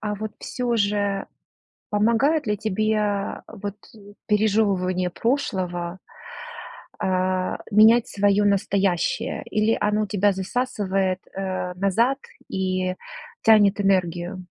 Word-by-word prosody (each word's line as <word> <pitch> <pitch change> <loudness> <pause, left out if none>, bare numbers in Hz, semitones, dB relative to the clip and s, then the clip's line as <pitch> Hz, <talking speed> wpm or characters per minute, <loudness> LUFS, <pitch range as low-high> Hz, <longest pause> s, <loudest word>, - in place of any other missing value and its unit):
а, 210 -1 -2
вот 215 +1 -5
всё 245 -2 -2
же 200 -1 0 0.6
помогает 230 +8 +2
ли 210 0 0
тебе 210 -1 -1
вот 205 0 -6 0.5
пережёвывание 200 -4 +1
прошлого, 185 -7 -2 1.0
э, - - 0 0.7
менять 220 +3 +6
своё 205 0 +2
настоящее? 200 +3 0
Или 215 +1 +2
оно 210 0 +1
тебя 200 +1 +2
засасывает, 190 -2 -1
э, 185 -2 -3
назад 225 +9 +1 0.3
и 185 -1 -1 0.5
тянет 210 -2 +5
энергию? 180 -1 0
205 Hz, 95 wpm, -23 LUFS, 185-215 Hz, 1.0 s, менять